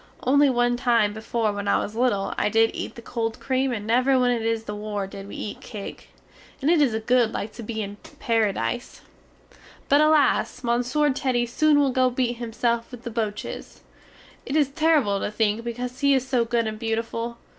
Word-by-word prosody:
Only 285 Hz, +2 st, +4 dB
one 245 Hz, -1 st, +2 dB
time 235 Hz, -4 st, +2 dB
before 220 Hz, 0 st, -1 dB
when 205 Hz, 0 st, -4 dB
I -, -, +3 dB
was 210 Hz, -, -3 dB
little 230 Hz, -5 st, +1 dB
I 210 Hz, -, +1 dB
did 225 Hz, +1 st, +3 dB
eat -, -, -5 dB
the 235 Hz, -, -11 dB
cold 225 Hz, -2 st, -3 dB
cream 265 Hz, 0 st, 0 dB
and 210 Hz, -4 st, -4 dB
never 255 Hz, +4 st, +3 dB
when 250 Hz, -1 st, +3 dB
it 240 Hz, -2 st, 0 dB
is 225 Hz, 0 st, -1 dB
the 210 Hz, -, -6 dB
war 210 Hz, -1 st, -4 dB
did 195 Hz, +1 st, -9 dB
we -, -, -9 dB
eat 210 Hz, -, -6 dB
cake. 210 Hz, -5 st, -8 dB, 0.5 s
And 290 Hz, +4 st, +2 dB
it 335 Hz, -3 st, +4 dB
is 235 Hz, -6 st, +2 dB
good 245 Hz, -2 st, +3 dB
like 210 Hz, +1 st, -4 dB
to -, -, -9 dB
be 220 Hz, -1 st, -4 dB
in 200 Hz, 0 st, -7 dB, 0.2 s
Paradise! 220 Hz, -, -1 dB, 0.9 s
But 285 Hz, +2 st, +5 dB
alas! 295 Hz, -4 st, +3 dB
Monsieur 245 Hz, +5 st, +1 dB
Teddy 255 Hz, -3 st, 0 dB
soon 295 Hz, +5 st, +3 dB
will 280 Hz, -2 st, +3 dB
go 255 Hz, 0 st, +3 dB
beat 245 Hz, -1 st, -1 dB
himself 235 Hz, 0 st, -1 dB
with 245 Hz, -2 st, -11 dB
the 235 Hz, -, -5 dB
boches! 215 Hz, -2 st, -5 dB, 0.6 s
It 275 Hz, -, -4 dB
is 295 Hz, -3 st, +3 dB
terrible 295 Hz, -9 st, +2 dB
to -, -, -2 dB
think 215 Hz, +1 st, 0 dB
because 245 Hz, +2 st, -5 dB
he 280 Hz, -1 st, +4 dB
is 260 Hz, -1 st, -1 dB
so 250 Hz, -3 st, +1 dB
good 230 Hz, 0 st, 0 dB
and 215 Hz, 0 st, -4 dB
beautiful! 230 Hz, +1 st, -3 dB
235 Hz, 200 wpm, -24 LUFS, 220-255 Hz, 0.9 s, But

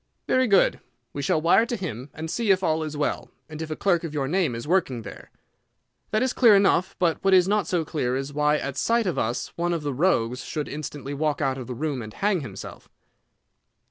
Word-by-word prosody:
"Very 255 Hz, 0 st, +3 dB
good; 200 Hz, -3 st, +4 dB, 0.3 s
we 140 Hz, -, -4 dB
shall 140 Hz, -, +1 dB
wire 225 Hz, +7 st, +4 dB
to 240 Hz, -, -2 dB
him, 145 Hz, -, -6 dB
and 160 Hz, +1 st, -5 dB
see 230 Hz, -3 st, -1 dB
if 190 Hz, -1 st, +4 dB
all 160 Hz, -2 st, +1 dB
is 155 Hz, -1 st, -4 dB
well, 145 Hz, -, -2 dB, 0.2 s
and 155 Hz, 0 st, -8 dB
if 160 Hz, -, -5 dB
a 155 Hz, -, -3 dB
clerk 175 Hz, -2 st, +1 dB
of 155 Hz, -2 st, -5 dB
your 135 Hz, -2 st, -1 dB
name 165 Hz, -5 st, 0 dB
is 115 Hz, +4 st, -6 dB
working 155 Hz, -10 st, +1 dB
there. -, -, -10 dB, 0.8 s
That 215 Hz, +3 st, +1 dB
is 260 Hz, -, 0 dB
clear 230 Hz, -5 st, +6 dB
enough; 195 Hz, -2 st, +3 dB
but 170 Hz, -1 st, 0 dB
what 195 Hz, -1 st, +5 dB
is 180 Hz, -1 st, +5 dB
not 210 Hz, +1 st, +1 dB
so 170 Hz, -3 st, 0 dB
clear 130 Hz, -5 st, -1 dB
is 135 Hz, +2 st, -4 dB
why 150 Hz, +1 st, +2 dB
at 140 Hz, -2 st, -5 dB
sight 230 Hz, +5 st, +2 dB
of 180 Hz, -, -1 dB
us 120 Hz, +3 st, -2 dB
one 175 Hz, +1 st, 0 dB
of 165 Hz, -3 st, -3 dB
the 145 Hz, -1 st, -2 dB
rogues 125 Hz, -6 st, +1 dB
should 150 Hz, -2 st, -4 dB
instantly 145 Hz, -2 st, -6 dB
walk 150 Hz, +1 st, -1 dB
out 135 Hz, -2 st, 0 dB
of 125 Hz, -, -7 dB
the 125 Hz, -, -5 dB
room 145 Hz, -1 st, -2 dB
and 110 Hz, -1 st, -9 dB
hang 200 Hz, -2 st, +1 dB
himself." 115 Hz, -9 st, -9 dB
155 Hz, 230 wpm, -25 LUFS, 140-190 Hz, 0.8 s, clear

